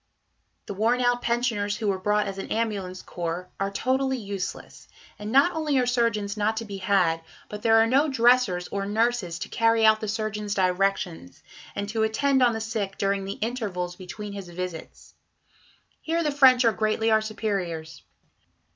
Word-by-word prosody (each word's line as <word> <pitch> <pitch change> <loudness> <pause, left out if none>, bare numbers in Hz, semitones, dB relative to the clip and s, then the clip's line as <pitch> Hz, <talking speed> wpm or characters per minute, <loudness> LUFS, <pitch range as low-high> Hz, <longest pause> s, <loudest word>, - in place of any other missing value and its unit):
The - - -5
worn 225 +5 +1
out 245 0 +2
pensioners 230 -4 0
who 220 - -3
were 190 -1 -1
brought 210 +2 +1
as 195 -1 -5
an - - -7
ambulance 200 -5 -2
corps 175 +1 -5
are 195 0 0
totally 260 +5 0
useless, 200 -4 -6 0.3
and 210 +1 -5
not 275 +7 +5
only 305 -3 0
are 250 - +3
surgeons 230 -4 0
not 215 +1 0
to 230 - -3
be 200 -2 -6
had, 185 -4 +2 0.3
but 210 0 -7
there 225 0 +4
are 225 - +6
no 270 +6 +3
dressers 240 -8 +3
or 200 0 -3
nurses 220 -5 0
to - - -5
carry 225 -1 +3
out 220 0 +5
the 215 - -3
surgeon's 210 -1 -3
directions, 185 - -1 0.3
and 200 0 -3
to 220 +1 -1
attend 265 +5 +2
on 245 -2 +4
the 225 - -3
sick 215 -3 -3
during 195 0 0
the 195 - -3
intervals 200 -7 -3
between 200 +3 -8
his 195 -3 -7
visits. 175 -1 -7 0.9
Here 335 +1 -1
the 300 - +1
French 260 -3 +6
are 230 - +5
greatly 220 +1 0
our 220 0 +4
superiors. 190 -7 -4
215 Hz, 175 wpm, -25 LUFS, 195-235 Hz, 0.9 s, are